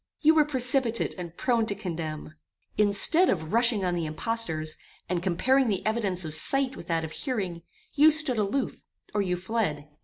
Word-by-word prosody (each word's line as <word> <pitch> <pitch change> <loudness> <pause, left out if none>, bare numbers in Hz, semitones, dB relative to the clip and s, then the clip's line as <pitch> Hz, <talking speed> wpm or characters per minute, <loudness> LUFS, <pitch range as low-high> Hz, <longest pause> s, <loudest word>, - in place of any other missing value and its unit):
"You 315 +1 +5
were 310 -2 +4
precipitate 255 -4 +1
and 170 -1 -8
prone 235 -3 0
to 200 - -2
condemn. 160 -6 -6 0.4
Instead 210 - +4
of 160 -1 -2
rushing 230 -4 +2
on 180 - -1
the 170 -2 -2
impostors, 155 -3 -2 0.3
and 175 -1 -2
comparing 250 +9 +1
the 200 -4 -2
evidence 205 -5 -1
of 155 - -2
sight 270 - +2
with 170 - -11
that 165 -2 -1
of 160 - -9
hearing, 190 - -4 0.3
you 300 +1 +6
stood 305 -6 +5
aloof, 210 +7 -2 0.3
or 210 - 0
you 180 -2 -1
fled. 180 -7 -3
205 Hz, 175 wpm, -26 LUFS, 170-255 Hz, 0.4 s, you